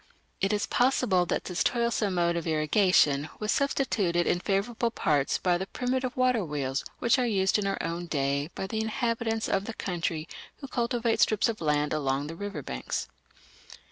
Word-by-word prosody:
It 195 Hz, -, +1 dB
is 210 Hz, -1 st, 0 dB
possible 200 Hz, -8 st, +2 dB
that -, -, -1 dB
this 180 Hz, -1 st, -1 dB
toilsome 235 Hz, -5 st, 0 dB
mode 170 Hz, -1 st, +2 dB
of 170 Hz, 0 st, -3 dB
irrigation 155 Hz, -2 st, +3 dB
was 215 Hz, 0 st, -1 dB
substituted 205 Hz, -11 st, +1 dB
in 175 Hz, -, +1 dB
favourable 210 Hz, +5 st, 0 dB
parts 150 Hz, -10 st, +1 dB
by 175 Hz, -1 st, +1 dB
the 190 Hz, -, -4 dB
primitive 255 Hz, +2 st, -2 dB
water 250 Hz, -4 st, +3 dB
wheels 140 Hz, -4 st, -2 dB
which 235 Hz, +3 st, +3 dB
are 250 Hz, -, +2 dB
used 195 Hz, -2 st, +2 dB
in 200 Hz, -, -1 dB
our 195 Hz, -, -1 dB
own 170 Hz, +1 st, -3 dB
day 140 Hz, -1 st, 0 dB
by -, -, -3 dB
the 220 Hz, +3 st, -2 dB
inhabitants 225 Hz, 0 st, -1 dB
of 195 Hz, 0 st, 0 dB
the 225 Hz, -, -6 dB
country 165 Hz, -3 st, -3 dB, 0.3 s
who 275 Hz, -, -9 dB
cultivate 235 Hz, -2 st, 0 dB
strips 215 Hz, +1 st, +3 dB
of 220 Hz, -4 st, -4 dB
land 150 Hz, -1 st, +1 dB
along 140 Hz, -2 st, 0 dB
the 160 Hz, +2 st, -6 dB
river 205 Hz, +3 st, -5 dB
banks. -, -, -4 dB
195 Hz, 175 wpm, -28 LUFS, 165-230 Hz, 0.3 s, irrigation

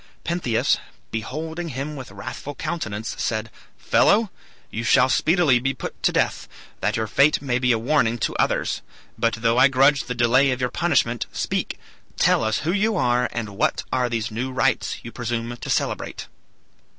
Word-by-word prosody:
Pentheus, 170 Hz, -10 st, +1 dB, 0.3 s
beholding 160 Hz, +9 st, -4 dB
him 140 Hz, +2 st, -4 dB
with 130 Hz, -3 st, -8 dB
wrathful 100 Hz, +8 st, -7 dB
countenance, 120 Hz, -9 st, -4 dB
said, 110 Hz, 0 st, -2 dB, 0.3 s
"Fellow! 215 Hz, -1 st, +3 dB, 0.4 s
you 115 Hz, -, -3 dB
shall 125 Hz, +2 st, +4 dB
speedily 160 Hz, -5 st, +3 dB
be 135 Hz, +2 st, -1 dB
put -, -, -7 dB
to -, -, +3 dB
death, -, -, 0 dB, 0.3 s
that -, -, 0 dB
your 110 Hz, -, 0 dB
fate 140 Hz, +8 st, +3 dB
may 130 Hz, -3 st, -1 dB
be 125 Hz, 0 st, +2 dB
a 115 Hz, -, +3 dB
warning 120 Hz, -1 st, +1 dB
to -, -, -2 dB
others; -, -, 0 dB, 0.3 s
but 115 Hz, -1 st, +1 dB
though 115 Hz, +2 st, +1 dB
I 135 Hz, -, +8 dB
grudge 135 Hz, 0 st, +3 dB
the 125 Hz, 0 st, -4 dB
delay 125 Hz, +3 st, +4 dB
of 130 Hz, -1 st, -1 dB
your 125 Hz, -1 st, -1 dB
punishment, 140 Hz, -9 st, +1 dB
speak, -, -, -2 dB, 0.4 s
tell -, -, +3 dB
us 110 Hz, 0 st, 0 dB
who 160 Hz, -, 0 dB
you 210 Hz, +2 st, +1 dB
are, 125 Hz, -2 st, +2 dB
and 115 Hz, -3 st, -4 dB
what 100 Hz, +1 st, 0 dB
are 125 Hz, -1 st, +1 dB
these 115 Hz, -2 st, -2 dB
new 125 Hz, +4 st, -3 dB
rites 130 Hz, 0 st, 0 dB
you 115 Hz, -, -8 dB
presume 120 Hz, 0 st, -3 dB
to -, -, -8 dB
celebrate." -, -, -2 dB
125 Hz, 175 wpm, -23 LUFS, 115-145 Hz, 0.4 s, I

